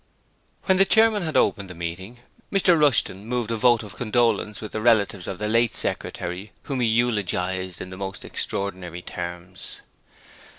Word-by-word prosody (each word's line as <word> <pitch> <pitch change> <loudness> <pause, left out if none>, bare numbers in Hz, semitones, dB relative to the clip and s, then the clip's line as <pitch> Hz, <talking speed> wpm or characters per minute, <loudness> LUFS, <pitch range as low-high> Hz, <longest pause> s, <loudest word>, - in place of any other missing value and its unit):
When 190 -1 +3
the 195 - +7
Chairman 220 0 +4
had 160 -3 -1
opened 100 -3 +2
the 90 - -8
meeting, 95 +8 -6 0.3
Mr 190 -3 +4
Rushton 140 - +3
moved 120 0 -2
a - - +1
vote 120 0 +4
of 105 -1 -10
condolence 115 -3 +1
with 110 - -7
the 110 - -3
relatives 105 -5 +3
of 95 - -4
the 105 - -2
late 115 +1 +2
secretary 90 +4 -3
whom 135 -3 -3
he 120 - +2
eulogized 95 -6 0
in 95 - -7
the 95 - -8
most 95 0 -6
extraordinary 90 -3 -4
terms. 90 +1 -7
105 Hz, 165 wpm, -24 LUFS, 95-120 Hz, 0.3 s, the